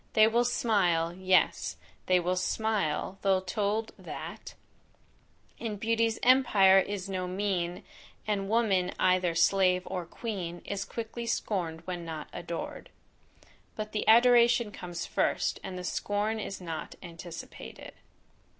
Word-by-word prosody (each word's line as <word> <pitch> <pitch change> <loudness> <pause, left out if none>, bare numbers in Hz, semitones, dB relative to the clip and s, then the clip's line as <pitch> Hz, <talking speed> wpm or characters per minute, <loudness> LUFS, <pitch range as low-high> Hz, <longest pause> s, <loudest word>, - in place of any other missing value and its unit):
They 215 -1 +7
will 235 +2 +3
smile, 180 -9 +1
yes, 185 -2 +2 0.3
they 185 0 +4
will 180 +1 0
smile, 195 -2 -1
though 195 -1 +3
told 205 +4 -1
that - - -8 1.0
"In 220 -3 -3
beauty's 225 +1 +1
empire 215 -7 +6
is 195 -1 -3
no 185 -2 -3
mean, 180 -2 -2 0.4
And 200 -2 -1
woman 200 -5 +2
either 180 -2 +2
slave 180 +1 +3
or 180 -3 -4
queen, 180 -6 -5
Is 200 -1 -3
quickly 230 +1 -6
scorn'd 170 -8 -2
when 180 -2 -4
not 160 -2 -6
ador'd." 170 -1 -6 0.9
But 215 0 -5
the 210 - -2
adoration 235 -1 +6
comes 175 -3 -6
first, - - 0
and 185 - -6
the 180 - -6
scorn 205 +4 -1
is 200 -2 -5
not 165 -4 -6
anticipated. 170 -1 -9
195 Hz, 125 wpm, -29 LUFS, 180-220 Hz, 1.0 s, They